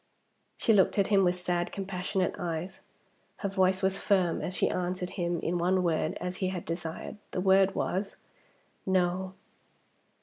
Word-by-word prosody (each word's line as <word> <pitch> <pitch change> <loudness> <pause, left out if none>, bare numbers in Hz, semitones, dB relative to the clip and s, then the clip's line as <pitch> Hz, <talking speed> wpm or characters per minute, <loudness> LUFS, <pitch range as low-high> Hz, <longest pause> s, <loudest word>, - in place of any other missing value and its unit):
She 225 - +3
looked 195 0 +4
at 200 - +2
him 195 -1 +6
with 180 0 +3
sad 180 -1 -1
compassionate 190 -1 -2
eyes. 175 +1 -4 0.6
Her 200 - -2
voice 190 0 +2
was 190 +1 +2
firm 185 -5 +2
as 185 - -2
she - - +3
answered 180 0 -2
him 175 -2 -1
in 175 +1 -1
one 180 +2 +2
word 160 -2 0
as 180 0 -4
he 185 - 0
had 185 -2 -4
desired. 165 +4 -5 0.2
The - - -1
word 195 0 +4
was 195 +2 -2 0.7
"No." 185 0 0
185 Hz, 160 wpm, -29 LUFS, 175-190 Hz, 0.7 s, him